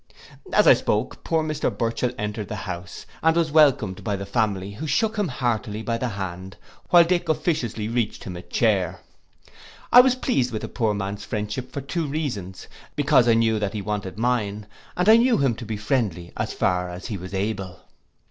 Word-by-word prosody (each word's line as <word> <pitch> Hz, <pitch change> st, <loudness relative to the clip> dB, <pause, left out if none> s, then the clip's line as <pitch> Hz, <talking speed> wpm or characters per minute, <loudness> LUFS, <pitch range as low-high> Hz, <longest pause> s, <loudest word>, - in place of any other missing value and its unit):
'—As -, -, +4 dB
I -, -, +9 dB
spoke, -, -, -1 dB
poor 160 Hz, -1 st, +1 dB
Mr 155 Hz, -2 st, -1 dB
Burchell 115 Hz, +3 st, -1 dB
entered 105 Hz, 0 st, -4 dB
the -, -, -5 dB
house, 90 Hz, -2 st, -7 dB, 0.2 s
and 160 Hz, 0 st, +3 dB
was 165 Hz, -2 st, +1 dB
welcomed 140 Hz, -11 st, +3 dB
by 105 Hz, -2 st, -1 dB
the 100 Hz, 0 st, -5 dB
family, 100 Hz, -2 st, -1 dB
who 150 Hz, +10 st, -6 dB
shook 220 Hz, +10 st, +1 dB
him 205 Hz, -3 st, 0 dB
heartily 115 Hz, -5 st, -2 dB
by 115 Hz, 0 st, -1 dB
the 125 Hz, -, -1 dB
hand, 95 Hz, -3 st, -6 dB, 0.3 s
while 175 Hz, -1 st, +8 dB
little 175 Hz, +2 st, +2 dB
Dick 175 Hz, -, -13 dB
officiously 120 Hz, -, -1 dB
reached 115 Hz, -1 st, -2 dB
him 90 Hz, -, -6 dB
a 85 Hz, -, -6 dB
chair. -, -, 0 dB, 0.9 s
I 245 Hz, -, +10 dB
was 255 Hz, 0 st, +3 dB
pleased 185 Hz, -, 0 dB
with 110 Hz, -, -3 dB
the -, -, -4 dB
poor 110 Hz, -4 st, 0 dB
man's 100 Hz, +1 st, -4 dB
friendship 105 Hz, +4 st, -4 dB
for 140 Hz, -, -4 dB
two 155 Hz, +4 st, -3 dB
reasons; 120 Hz, -, -4 dB, 0.3 s
because 120 Hz, -, +4 dB
I 115 Hz, -, +5 dB
knew 110 Hz, -1 st, +2 dB
that 100 Hz, -2 st, -2 dB
he 105 Hz, -2 st, -4 dB
wanted 100 Hz, -2 st, -4 dB
mine, 105 Hz, -3 st, -1 dB, 0.3 s
and 180 Hz, +2 st, +1 dB
I 220 Hz, +1 st, +9 dB
knew 245 Hz, +1 st, +4 dB
him 135 Hz, -4 st, +2 dB
to 115 Hz, 0 st, -8 dB
be 110 Hz, -1 st, -3 dB
friendly 105 Hz, -, -1 dB
as -, -, -2 dB
far 90 Hz, -1 st, 0 dB
as 90 Hz, +1 st, -8 dB
he 110 Hz, -5 st, -4 dB
was 95 Hz, +2 st, -7 dB
able. 95 Hz, -2 st, -3 dB
110 Hz, 200 wpm, -24 LUFS, 100-145 Hz, 0.9 s, I